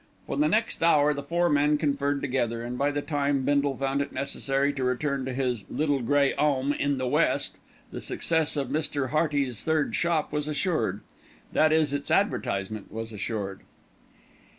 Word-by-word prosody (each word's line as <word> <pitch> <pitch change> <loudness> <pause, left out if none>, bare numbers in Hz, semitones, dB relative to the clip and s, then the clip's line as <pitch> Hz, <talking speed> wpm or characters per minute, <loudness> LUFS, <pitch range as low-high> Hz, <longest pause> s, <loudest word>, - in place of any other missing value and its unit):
For - - -4
the 300 +1 +3
next 225 -2 +1
hour 150 -3 +4
the 140 - -4
four 170 +4 +1
men 150 -1 +3
conferred 145 -1 0
together, 120 -4 -1
and 120 +1 -4
by 140 +3 +1
the 145 0 -2
time 140 -3 0
Bindle 140 -1 +1
found 135 +1 0
it 140 - -4
necessary 140 +1 -1
to 135 - -3
return 130 +1 -1
to 130 - -3
his 125 -5 -1
"little 145 -3 0
grey 140 +3 +2
'ome 140 -1 +2
in 140 -1 0
the 130 - -2
west," 125 - +1 0.3
the - - -6
success 160 -2 0
of 135 -3 -1
Mr. 145 -2 -1
Hearty's 145 -6 0
third 160 -2 +1
shop 170 -3 0
was 150 0 -1
assured, 150 - -1 0.5
that 155 0 +4
is 155 -2 +2
its 145 0 -3
advertisement 110 - -1
was 110 +1 -5
assured. 100 -2 -4
140 Hz, 175 wpm, -27 LUFS, 130-150 Hz, 0.5 s, hour